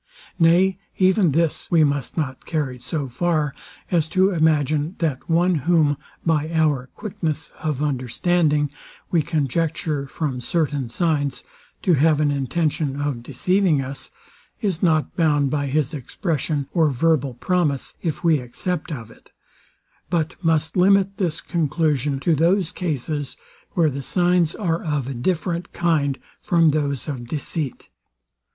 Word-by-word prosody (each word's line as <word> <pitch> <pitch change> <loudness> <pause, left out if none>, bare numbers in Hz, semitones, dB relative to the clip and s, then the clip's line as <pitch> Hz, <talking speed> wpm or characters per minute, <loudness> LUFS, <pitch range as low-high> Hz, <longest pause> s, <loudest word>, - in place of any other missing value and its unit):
Nay, 180 +3 +4 0.2
even 190 -1 +4
this 160 +2 0
we 165 -2 +5
must 145 -1 -1
not 135 -5 -3
carry 145 -6 -2
so 135 +3 -3
far 150 +2 0 0.4
as 165 -3 +2
to 190 +3 +3
imagine, 155 -1 +1
that 155 -5 -2
one, 175 +2 +3 0.2
whom, 155 -4 +4 0.3
by 160 -2 +1
our 150 -6 +1
quickness 175 -8 -4
of 150 -2 -2
understanding, 150 +3 +1 0.4
we 170 - +4
conjecture, 155 0 -1
from 135 -3 -3
certain 145 -3 -1
signs, 145 0 0 0.4
to 185 - +4
have 155 +1 +4
an 150 -1 +2
intention 145 0 -1
of 145 -4 -2
deceiving 175 +6 +1
us, 135 +1 -6 0.5
is 195 -7 -1
not 160 -5 +2
bound 145 -5 +2
by 145 -2 0
his 145 +1 0
expression 150 - -2
or 160 -4 +4
verbal 140 -1 +1
promise, 155 -1 0
if 165 0 -3
we 160 -3 +4
accept 150 +7 -4
of 115 -6 -6
it; - - -20 0.8
but 165 -3 0
must 160 -1 +1
limit 195 +1 +4
this 170 -5 -1
conclusion 150 -4 0
to 165 +5 +2
those 170 +3 +2
cases, 150 -3 -3 0.4
where 160 -4 +3
the 140 +1 -4
signs 175 +2 +2
are 170 -5 -1
of 150 -5 -2
a 135 - -3
different 170 +6 -2
kind 150 -5 +1 0.2
from 170 -4 +4
those 145 -2 -1
of 125 -5 -5
deceit. 145 0 -4
155 Hz, 140 wpm, -22 LUFS, 140-170 Hz, 0.8 s, we